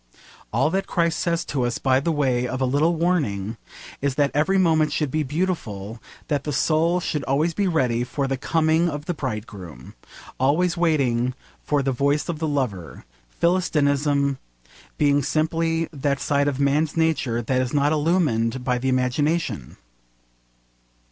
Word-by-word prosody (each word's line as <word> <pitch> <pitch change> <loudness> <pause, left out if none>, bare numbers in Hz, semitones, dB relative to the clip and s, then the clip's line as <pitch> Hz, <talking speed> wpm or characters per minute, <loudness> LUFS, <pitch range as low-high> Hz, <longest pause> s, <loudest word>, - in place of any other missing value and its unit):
All 135 +7 +1
that 195 +1 -1
Christ 170 -2 0
says 170 0 0
to 140 - -2
us 120 -1 -1
by 130 -1 +2
the 165 +5 -1
way 130 -5 +1
of 130 - -4
a 130 - +1
little 145 +6 +2
warning 130 - -1 0.4
is 140 -1 0
that 145 -1 +2
every 160 +7 +2
moment 160 -4 +3
should 150 -3 -1
be 155 - 0
beautiful, 130 - -3 0.3
that 145 -3 -1
the 150 - -3
soul 165 +4 +2
should 150 -4 -2
always 150 +5 +1
be 200 +3 0
ready 125 -8 +1
for 140 +3 -2
the 135 - -1
coming 160 +4 +1
of 145 -1 -5
the 175 - -1
bridegroom, 105 - -7 0.5
always 160 +7 +2
waiting 130 -8 +1 0.3
for 145 -2 0
the 135 - 0
voice 140 +3 0
of 160 -3 -3
the 160 - -1
lover, 125 - -3 0.3
Philistinism 145 -5 +1 0.6
being 145 -1 +3
simply 165 +2 0
that 140 -1 -1
side 140 -1 +1
of 140 -2 -1
man's 145 +3 +1
nature 150 -8 +1
that 130 +3 +1
is 125 -2 -2
not 145 0 +2
illumined 145 -7 +1
by 125 -1 0
the 130 +2 -1
imagination. 130 - -1
145 Hz, 160 wpm, -23 LUFS, 130-160 Hz, 0.6 s, moment